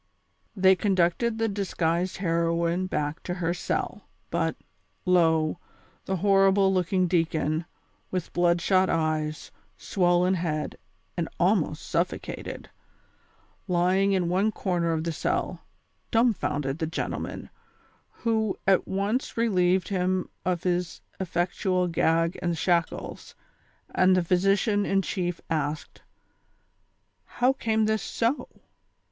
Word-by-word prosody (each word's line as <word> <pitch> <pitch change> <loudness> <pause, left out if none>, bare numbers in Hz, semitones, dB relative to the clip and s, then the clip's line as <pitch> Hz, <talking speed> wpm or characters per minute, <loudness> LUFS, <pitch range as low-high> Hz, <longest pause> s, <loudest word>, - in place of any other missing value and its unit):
They 190 -1 +5
conducted 195 +4 +1
the 225 0 +1
disguised 180 -3 -1
heroine 170 0 0
back 150 -3 -2
to 180 - -4
her 170 -2 -1
cell, 175 - -3 0.2
but, - - 0 0.5
lo, 165 -3 +3 0.5
the 190 - -1
horrible 195 0 +4
looking 185 0 +1
deacon, 160 -2 0 0.4
with 185 -2 -4
blood 175 0 +2
shot 185 +1 +3
eyes, 155 -1 -1 0.3
swollen 180 0 +2
head 160 -4 -2 0.4
and - - -2
almost - - +1
suffocated, - - -3 1.0
lying 185 +3 +2
in 185 -3 +1
one 190 +5 +2
corner 175 -5 -1
of 160 -1 -1
the 170 - -1
cell, 155 - -2 0.5
dumbfounded 165 - +1
the 160 - -1
gentlemen, 160 - -4 0.6
who 220 -3 -1
at 190 -1 +3
once 200 +7 -1
relieved 185 -5 +2
him 185 -1 0 0.2
of 180 -2 -1
his 180 -1 -1 0.2
effectual 180 +1 0
gag 165 0 +1
and 170 -1 -1
shackles, 170 0 -1 0.6
and 185 0 +4
the 180 - +2
physician 195 +4 +2
in 195 -1 +1
chief 175 -3 -3
asked: 150 -2 -3 0.7
" - - -46
How 250 +2 +4
came 220 -4 0
this 220 -1 +1
so 235 +5 -1
180 Hz, 115 wpm, -26 LUFS, 170-195 Hz, 1.0 s, They